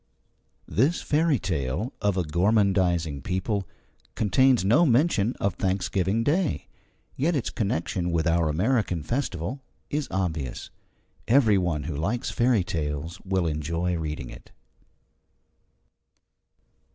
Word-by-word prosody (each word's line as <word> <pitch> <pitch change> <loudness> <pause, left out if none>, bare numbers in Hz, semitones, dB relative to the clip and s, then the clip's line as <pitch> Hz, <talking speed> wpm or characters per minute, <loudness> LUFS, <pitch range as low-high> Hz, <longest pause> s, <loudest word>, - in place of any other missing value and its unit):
This 140 - +1
fairy 155 -1 +2
tale 85 - -2
of 100 -2 +1
a 90 - +1
gormandizing 90 -3 +1
people 95 - -2 0.5
contains 120 +1 +3
no 120 - +5
mention 125 -5 +2
of 100 - -1
Thanksgiving 95 +3 0
Day. 160 +5 0 0.5
Yet 160 +5 +1
its 130 - -1
connection 90 -3 -1
with 85 -2 0
our 85 -2 +2
American 95 - 0
festival 120 - -3 0.3
is 145 -2 -1
obvious. 80 -9 -3 0.6
Every 115 -5 +5
one 85 -5 -1
who 75 0 -4
likes 105 - -2
fairy 120 -5 +2
tales 80 +1 -4
will 95 -2 0
enjoy 85 +3 -1
reading 75 -5 -4
it. - - -13
95 Hz, 115 wpm, -26 LUFS, 85-120 Hz, 0.6 s, no